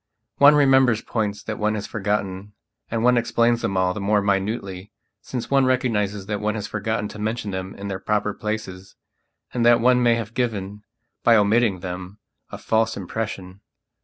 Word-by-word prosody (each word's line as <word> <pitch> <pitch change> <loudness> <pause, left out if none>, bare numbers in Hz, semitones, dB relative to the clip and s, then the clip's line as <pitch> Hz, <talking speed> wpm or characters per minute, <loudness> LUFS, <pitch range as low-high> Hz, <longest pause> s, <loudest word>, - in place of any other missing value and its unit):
One 145 +1 +8
remembers 130 -5 +4
points 105 -3 -3
that 110 -1 -5
one 110 0 +1
has 105 - -4
forgotten 100 -1 -3 0.4
and 115 0 -2
one 125 0 +5
explains 115 0 +1
them 95 - -1
all 90 0 +2
the 100 - -5
more 105 +1 +2
minutely 100 -1 -2 0.3
since 125 0 -6
one 135 -1 +4
recognizes 105 -6 0
that 105 0 -3
one 105 +1 -1
has 105 -2 -4
forgotten 110 0 -2
to 110 - -10
mention 110 -1 -3
them 95 0 -5
in 100 - -7
their 95 -1 -4
proper 105 +1 -1
places 105 -4 -5 0.6
and 120 - 0
that 120 0 +6
one 125 +1 +4
may 120 -1 +4
have 115 -1 -5
given, 105 -4 -3 0.4
by 115 - +5
omitting 105 -2 +2
them, 90 +2 -7 0.3
a - - -7
false 110 0 0
impression. 95 -1 -5
105 Hz, 175 wpm, -23 LUFS, 100-115 Hz, 0.6 s, One